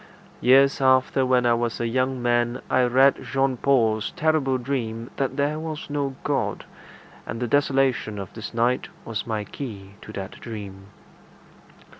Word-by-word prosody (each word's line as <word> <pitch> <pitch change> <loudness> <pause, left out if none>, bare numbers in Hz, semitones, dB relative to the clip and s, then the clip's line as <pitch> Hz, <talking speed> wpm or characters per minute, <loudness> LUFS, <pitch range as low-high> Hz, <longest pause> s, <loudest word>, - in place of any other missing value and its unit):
Years 135 +2 +5
after, 130 0 +3
when 125 -1 +3
I 120 - +4
was 115 0 -1
a 120 - 0
young 130 +1 -1
man, 120 +1 +1
I 130 - +4
read 130 +3 +4
Jean 135 -1 0
Paul's 115 -5 +2
terrible 150 -4 +1
dream 120 -3 -3
that 135 0 -1
there 145 +2 0
was 155 -2 -6
no 140 -2 -2
God, - - -1 0.6
and 115 - -4
the 120 - -1
desolation 135 -4 +1
of 100 -2 -7
this 110 -2 -7
night 120 +2 +1 0.2
was 115 -1 -4
my 110 -2 -2
key 100 -4 -8
to - - -10
that 95 -2 -7
dream. 100 -4 -8
125 Hz, 155 wpm, -24 LUFS, 115-135 Hz, 0.6 s, Years